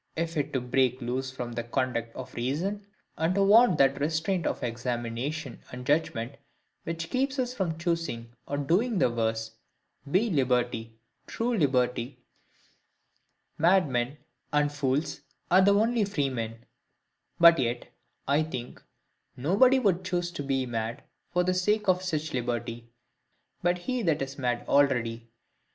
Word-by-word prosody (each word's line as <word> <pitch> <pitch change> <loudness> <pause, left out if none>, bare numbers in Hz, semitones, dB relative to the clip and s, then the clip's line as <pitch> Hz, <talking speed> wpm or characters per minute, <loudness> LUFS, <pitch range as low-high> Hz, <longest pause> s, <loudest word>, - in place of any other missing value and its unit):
If 165 0 -2
to 145 -4 -1
break 125 0 +1
loose 130 +2 -2
from 125 -2 -6
the 120 0 -3
conduct 120 -2 -2
of 130 - -8
reason, 180 +12 -2 0.3
and 165 +3 +1
to 200 - +3
want 205 -2 +6
that 135 0 +3
restraint 160 +4 0
of - - -3
examination 120 +4 -3
and 125 0 -7
judgment 140 -4 0 0.5
which 165 0 -4
keeps 265 +2 0
us 250 -1 -1
from 180 -9 -2
choosing 165 -9 -2
or 145 - -2
doing 190 - +1
the 125 - +3
worse, 110 -1 -1 0.6
be 200 +8 +2
liberty, 120 -5 0 0.3
true 235 +1 -1
liberty, 125 - +1 1.4
madmen 150 -7 +2 0.3
and 150 0 +2
fools 145 +1 -1 0.3
are 185 +2 +7
the 200 +1 +5
only 225 +2 +2
freemen: 125 - -2 0.7
but 170 -2 +8
yet, 120 -1 -1 0.4
I 140 +3 +3
think, 130 -6 -6 0.6
nobody 200 - +4
would 195 -8 +1
choose 175 -1 -1
to 175 - -5
be 135 -2 0
mad 115 -1 -4 0.3
for 180 0 +1
the 185 +1 +1
sake 210 +4 +1
of 185 -1 +3
such 160 -4 -2
liberty, 120 -1 -3 0.7
but 175 0 +2
he 250 +7 -2
that 160 -8 +1
is 135 +1 -7
mad 125 -2 -1
already. 120 -5 +2
145 Hz, 140 wpm, -28 LUFS, 125-180 Hz, 1.4 s, but